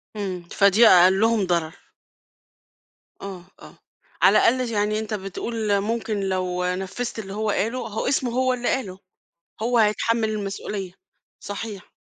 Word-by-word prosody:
إمم 185 -4 -4
فدي 205 +3 +5
أقلهم 195 +4 +5
ضرر. 170 -2 -1 1.5
آه، 190 -3 -8 0.2
آه، - - -14 0.4
على - - +6
الأقل 250 -1 +2
يعني 210 0 0
أنت 220 0 -5
بتقول 205 +1 -2
ممكن 220 -1 -2
لو 185 -2 -1
نفّذت 190 +6 -3
اللي 195 -2 -7
هو 215 0 -2
قاله 230 +5 -1
هو 220 +3 -3
اسمه 260 -2 0
هو 255 +1 +1
اللي 245 -1 -3
قاله 195 -8 -2 0.6
هو 240 +1 +2
هيتحمل 220 +1 +2
المسؤولية. 200 -2 -4 0.5
صحيح. 205 -1 -7
210 Hz, 130 wpm, -23 LUFS, 190-230 Hz, 1.5 s, على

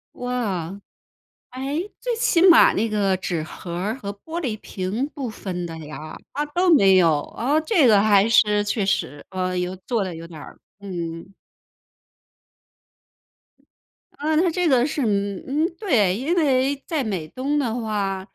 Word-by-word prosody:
哇， 235 -9 -2 0.9
诶， 280 +9 -3
最 - - -1
起 390 -7 +2
码 335 - +7
那 225 +2 0
个 200 -3 +1
纸 175 -3 -3
盒 170 +2 -8
儿 200 +6 -2
和 200 -5 -5
玻 320 +12 -7
璃 230 -9 -3
瓶， 205 +9 -3
不 270 -4 -4
分 185 -4 -5
的 165 -1 -6
呀？ 155 +1 -8 0.2
它 295 +1 -1
都 350 +4 +2
没 195 -7 +5
有， 165 -5 +4
啊， 280 +6 -1
这 315 - +3
个 210 -3 +6
还 205 0 +4
是 210 -2 +4
确 205 0 -1
实， 145 -7 -2
呃， 185 -1 -2
有 180 +1 -2
做 230 -5 0
得 185 -2 -5
有 165 +1 -8
点 165 -2 -11
儿 - - -12 0.2
嗯。 175 -1 -6 2.8
呃， 310 +2 0
它 350 +1 +3
这 360 +1 0
个 255 -4 +4
是， 300 -1 -2
嗯 200 -3 -1 0.2
嗯， 340 - -4
对， 220 - +2
因 280 - -1
为 275 -4 +2
在 310 -5 -1
美 190 -9 -3
东 275 - -2
的 240 -6 0
话， 200 -3 -2
215 Hz, 170 characters per minute, -22 LUFS, 185-280 Hz, 2.8 s, 码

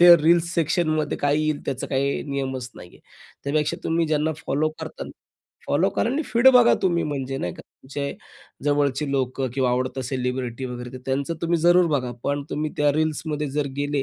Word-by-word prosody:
ते 175 0 +10
रील्स 170 +1 +3
सेक्शनमध्ये 155 -2 +1
काय 145 +1 +2
येईल, 155 -1 0
त्याचा 135 - -2
काही 140 +1 0
नियमच 130 -2 -3
नाही - - -11
आहे. - - -19 0.4
त्यापेक्षा 150 +1 0
तुम्ही 165 0 +1
ज्यांना 155 +1 +1
फॉलो 150 +3 +1
करता, - - -6 0.6
फॉलो - - +2
करा 235 - 0
आणि 300 +4 0
फीड 235 +3 +5
बघा 245 -1 +7
तुम्ही 170 -3 +2
म्हणजे 135 -2 -3
नाही 90 -7 -3
का, - - -11 0.2
तुमचे 140 +1 -4 0.5
जवळचे 145 -1 +1
लोक 130 0 -1
किंवा 130 -2 +2
आवडतं 130 +2 -1
सेलिब्रिटी 125 -1 -3
वगैरे 125 -1 -6
ते 130 - -7
त्यांचं 140 +5 -1
तुम्ही 170 0 +2
जरूर 175 +1 +5
बघा, 125 -2 -3
पण 140 0 0
तुम्ही 150 0 -2
त्या 145 -1 +4
रील्समध्ये 155 -1 -1
जर 145 +1 -1
गेले, 145 -1 0
145 Hz, 180 wpm, -24 LUFS, 135-160 Hz, 0.6 s, ते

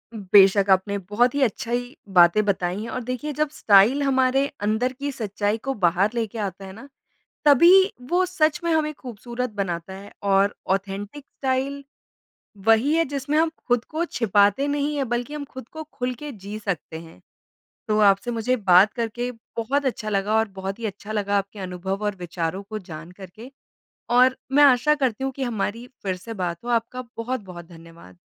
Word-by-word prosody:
बेशक, 195 -1 +5
आपने 195 +2 +2
बहुत 210 +7 0
ही 285 - 0
अच्छाई 245 +2 -2 0.2
बातें 175 +4 +6
बताई 190 -1 -1
हैं 230 - -6
और 250 +2 -4
देखिए, 255 +5 -4
जब 300 +1 0
स्टाइल 215 +4 +4
हमारे 265 0 +2 0.2
अंदर 220 +5 0
की 280 +2 -4
सच्चाई 210 -2 -2
को 270 - +1
बाहर 185 0 +2
लेके 230 -1 -3
आता 195 -1 -4
है 190 - -9
ना, 245 +7 -12 0.6
तभी 295 +4 +7 0.4
वो 365 +1 +3
सच 325 -2 +1
में 335 - +1
हमें 305 -1 +1
ख़ूबसूरत 245 -1 -6
बनाता 190 -3 -4
है 200 +1 -11
और 200 0 +2 0.2
ऑथेन्टिक 200 +7 -5
स्टाइल 275 +1 -3 0.8
वही 225 +7 +4
है, 330 0 +3
जिसमें 285 +1 -2
हम 325 0 +3 0.2
खुद 245 -1 +1
को 320 +2 -3
छिपाते 205 - +2
नहीं 290 +1 -1
हैं, 275 -3 -1
बल्कि 240 +5 -3
हम 295 - -5
खुद 260 -3 -10
को 315 0 -7
खुल 250 -1 -3
के 295 +4 -8
जी 205 -1 -8
सकते 190 -6 -4
हैं। 165 0 -15 0.7
तो 215 0 +2
आपसे 200 +3 +3
मुझे 235 +2 0
बात 195 -1 +5
करके 240 +1 -3 0.3
बहुत 270 +5 -1
अच्छा 220 -4 -2
लगा 205 +1 0
और 220 -1 +1
बहुत 195 +2 -4
ही 230 - -3
अच्छा 205 +1 -7
लगा 205 -1 0
आपके 200 +1 -6
अनुभव 190 +2 -4
और 205 -1 -1
विचारों 175 +1 -4
को 215 +2 -6
जानकर 180 +1 -10
के 235 +4 -11 0.6
और 255 +1 +5 0.2
मैं 290 +1 +6
आशा 280 +2 +5
करती 265 -3 -1
हूँ 270 - -2
कि 270 - -7
हमारी 230 0 -3 0.2
फिर 190 -2 -2
से 225 +5 -9
बात 175 0 -4
हो। - - -7
आपका 240 +2 -1
बहुत-बहुत 210 -8 -5
धन्यवाद। 165 - -15
225 Hz, 180 wpm, -23 LUFS, 195-260 Hz, 0.8 s, तभी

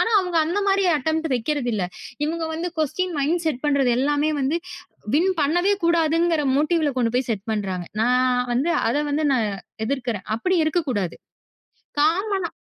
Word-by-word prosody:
ஆனா 455 - +2
அவங்க 360 -3 -1
அந்த 340 +6 -1
மாதிரி 390 0 +3
அட்டெம்ப்ட் 315 +3 -1
வெக்கிறது 255 +2 -1
இல்ல. 205 -4 -1 0.4
இவனுங்க 320 +2 -1
வந்து 335 +2 -2
க்வஸ்டீன் 315 +4 -1
மைண்ட் 325 +5 +1
செட் 295 -6 -1
பண்றது 280 -3 +2
எல்லாமே 290 +3 +1
வந்து, 275 +5 +1 0.6
வின் 355 +5 +3
பண்ணவே 350 +7 +2
கூடாதுங்கிற 330 -1 +2
மோட்டீவ்ல 305 0 +2
கொண்டு 230 -2 +1
போய் 250 0 0
செட் 205 -1 -3
பண்றாங்க. 190 -4 -3
நான் 250 +1 +2
வந்து 270 +8 +1 0.2
அத 230 - +1
வந்து 305 +2 0
நான் 230 -5 +1 0.4
எதிர்க்கிறேன். 240 -7 -3
அப்படி 370 +10 0
இருக்கக் 310 -1 0
கூடாது. 195 -8 -2 0.8
காம்மனா 370 +5 +1
300 Hz, 155 wpm, -23 LUFS, 250-335 Hz, 0.8 s, மாதிரி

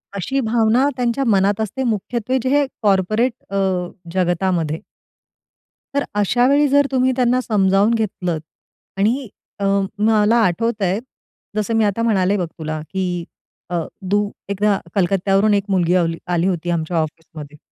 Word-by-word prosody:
अशी 255 +8 -1
भावना 230 +3 +2
त्यांच्या 245 +2 0
मनात 200 -1 +2
असते 240 +5 -3
मुख्यत्वे, 235 +2 -1
जे 260 - 0
हे 285 +1 +3 0.2
कॉर्पोरेट 215 +4 +2 0.2
अ, 200 - -5 0.6
जगतामध्ये. 175 -3 0 1.2
तर 280 - +2
अशा 240 +5 +2
वेळी 290 +1 +4
जर 285 +1 +4
तुम्ही 260 0 +2
त्यांना 250 0 +2
समजावून 200 -1 +2
घेतलंत 180 -7 -2 0.6
आणि 235 +7 +1 0.3
अं, 195 0 +1 0.2
मला 220 +1 +4
आठवतंय, 205 0 0 0.6
जसं 215 +2 -1
मी 225 - +3
आता 205 +3 0
म्हणाले 200 -3 +2
बघ 180 - -1
तुला, 155 -1 -5
की 180 +1 -3 0.5
अ, 175 -1 -1 0.3
तू 205 0 +2 0.2
एकदा 200 0 +1 0.2
कलकत्यावरून 195 +2 +2
एक 200 -1 +2
मुलगी 180 -2 +2
आ 180 - +4
आली 165 0 -2 0.2
आली 175 +2 +2
होती 175 -2 -2
आमच्या 170 0 -1
ऑफिसमध्ये. 155 -2 -5
200 Hz, 140 wpm, -20 LUFS, 180-230 Hz, 1.2 s, वेळी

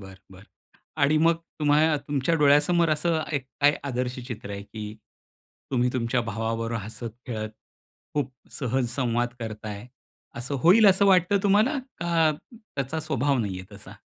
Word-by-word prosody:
बरं, 95 -1 -11 0.2
बरं 95 +1 -14 0.6
आणि 145 +2 +4
मग 165 +2 +4 0.2
तुम्हाला 150 +1 +3
तुमच्या 145 +2 +1
डोळ्यासमोर 150 +3 +4
असं 160 +1 +1
एक 140 -3 -1 0.2
काय 145 +1 +5
आदर्श 125 -2 -3
चित्र 110 -5 -7
आहे 100 0 -5
की 105 0 -7 0.8
तुम्ही 125 -1 +2
तुमच्या 120 0 0
भावाबरोबर 115 0 -2
हसत-खेळत, 110 +1 -6 0.6
खूप 140 -3 -1 0.2
सहज 125 -2 -1
संवाद 120 -2 0
करता 110 -2 -6
आहे, 105 +3 -7 0.5
असं 120 +4 -3
होईल 205 +5 +7
असं 195 +1 +5
वाटतं 190 +1 +4
तुम्हाला 210 +8 +3 0.2
का 165 -2 +2 0.2
त्याचा 160 - -5
स्वभाव 145 -3 0
नाही 100 -5 -2
आहे 95 +3 -11
तसा? 100 -1 -11
130 Hz, 145 wpm, -26 LUFS, 115-155 Hz, 0.8 s, होईल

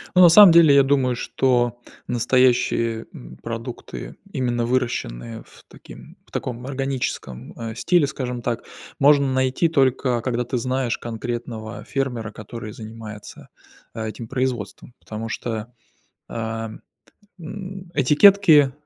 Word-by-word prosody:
Ну, 185 - +7
на 175 - +9
самом 200 +1 +9
деле, 165 -4 +7
я 140 - +7
думаю, 135 -2 +2
что 120 -1 0 0.3
настоящие, 120 -2 +2
м, - - -11
продукты, 115 +1 -7 0.2
именно 120 -3 -1
выращенные 115 - -2
в - - -19
таким - - -14
в - - -27
таком 125 0 -4
органическом, 135 - -4
э, 115 -1 -6
стиле, 165 +4 +2
скажем 125 -3 -4
так, 115 0 -3 0.4
можно 140 -1 +5
найти 130 +5 +1
только 130 -4 +1
когда 120 0 -1
ты 125 +1 -3
знаешь 125 0 -1
конкретного 115 -1 -6
фермера, 125 -5 -3
который 110 0 -8
занимается, 110 -1 -10 0.5
а, 110 -1 -4
этим 110 +2 -7
производством. 125 -3 -3
Потому 110 +1 -6
что, 115 +1 -5 0.6
ам, 115 -1 -5 0.6
м, 185 +1 -8
этикетки, 150 0 +6
125 Hz, 125 wpm, -22 LUFS, 115-135 Hz, 0.6 s, на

